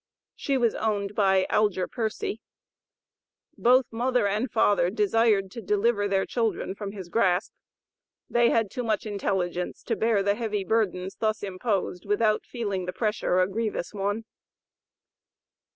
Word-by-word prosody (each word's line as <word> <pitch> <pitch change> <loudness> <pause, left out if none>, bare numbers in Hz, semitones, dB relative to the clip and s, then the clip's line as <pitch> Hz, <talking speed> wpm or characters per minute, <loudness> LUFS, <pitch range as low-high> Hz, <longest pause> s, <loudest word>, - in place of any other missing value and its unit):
She 275 -1 -1
was 235 -3 +2
owned 205 -2 -1
by 195 -2 +3
Algier 205 -4 +2
Pearcy. 220 -1 -3 1.1
Both 255 +2 +4
mother 245 -1 +1
and 215 +6 -1
father 205 -5 +3
desired 210 -1 +2
to 230 - -7
deliver 205 +1 +1
their 195 -1 +1
children 225 -5 -1
from 200 0 -6
his 190 -4 -8
grasp. 180 -1 +1 0.7
They 240 0 +3
had 225 -4 +1
too 250 - -3
much 220 0 -1
intelligence 185 -4 -2
to 230 - -1
bear 220 -3 +2
the 200 0 +2
heavy 210 -2 -2
burdens 190 -3 -1
thus 215 -1 -1
imposed 195 -1 -2
without 215 +1 +1
feeling 200 -7 -3
the 180 - -3
pressure 210 -4 +1
a 185 - +3
grievous 215 -1 -3
one. 205 +2 -2
210 Hz, 140 wpm, -26 LUFS, 195-225 Hz, 1.1 s, Both